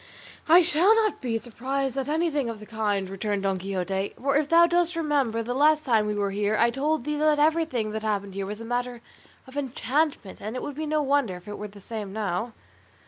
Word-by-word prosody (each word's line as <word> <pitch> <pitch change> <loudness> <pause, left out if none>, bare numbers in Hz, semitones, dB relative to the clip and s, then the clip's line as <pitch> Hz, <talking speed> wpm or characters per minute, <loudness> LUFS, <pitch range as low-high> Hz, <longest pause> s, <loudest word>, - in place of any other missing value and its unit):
"I 345 +2 +8
shall 350 +6 +4
not 440 -2 +1
be 235 -4 -1
surprised 260 +3 -3
at 270 0 -2
anything 305 -5 0
of 225 -2 -6
the 215 - -10
kind," 210 -3 -1
returned 195 +1 -3
Don 195 -1 0
Quixote; 190 +1 -3
"for 275 +1 0
if 295 0 +2
thou 335 +1 +7
dost 345 0 +1
remember 280 -8 0
the 245 +2 -3
last 305 +3 +3
time 220 -5 +3
we 210 - -1
were 200 -1 -1
here 205 +2 0
I 235 0 +4
told 290 +3 0
thee 300 +2 -2
that 305 0 +3
everything 300 -8 +1
that 220 0 -3
happened 200 -2 -2
here 195 0 -4
was 210 +2 -6
a 230 - -7
matter 245 0 -3 0.4
of 260 0 -14
enchantment, 275 -3 -1
and 215 +4 -5
it 255 - -4
would 290 - -4
be 310 +1 -4
no 305 0 +1
wonder 275 -8 +1
if 180 +2 -13
it 205 - -6
were 210 - -5
the 200 0 -14
same 210 -1 -6
now." 215 +2 -2
245 Hz, 225 wpm, -26 LUFS, 210-295 Hz, 0.4 s, I